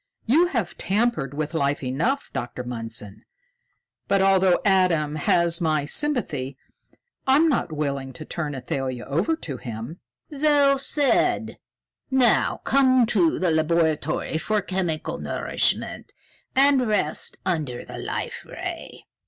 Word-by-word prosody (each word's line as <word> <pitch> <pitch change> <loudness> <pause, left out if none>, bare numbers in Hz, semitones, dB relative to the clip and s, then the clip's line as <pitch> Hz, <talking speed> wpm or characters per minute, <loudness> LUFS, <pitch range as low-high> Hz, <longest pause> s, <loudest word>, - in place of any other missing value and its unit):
"You 315 +10 +4
have 230 - -3
tampered 195 - 0
with 155 +2 -3
life 140 -3 0
enough, 170 - -1
Dr. 120 +1 -4
Mundson. 115 -4 -5 0.9
But, 195 - +3
although 190 -1 +4
Adam 180 -6 +3
has 170 +3 +2
my 155 -3 +1
sympathy, 150 - -1 0.7
I'm 285 +5 +5
not 260 - 0
willing 140 -3 -3
to 155 - -9
turn 150 -4 -4
Athalia 130 -1 -3
over 170 - 0
to 145 - -6
him." 115 +8 -7 0.3
"Well 285 -1 +3
said! 285 0 +1 0.5
Now 260 -3 +3
come 260 -2 +4
to 175 -6 +3
the 180 -2 +1
laboratory 160 -1 0
for 215 +5 0
chemical 180 -5 -2
nourishment - - -2 0.4
and 270 -2 +4
rest 200 -8 -1
under 150 -9 -2
the - - -8
Life - - -4
Ray." - - -7
170 Hz, 120 wpm, -24 LUFS, 140-240 Hz, 0.9 s, I'm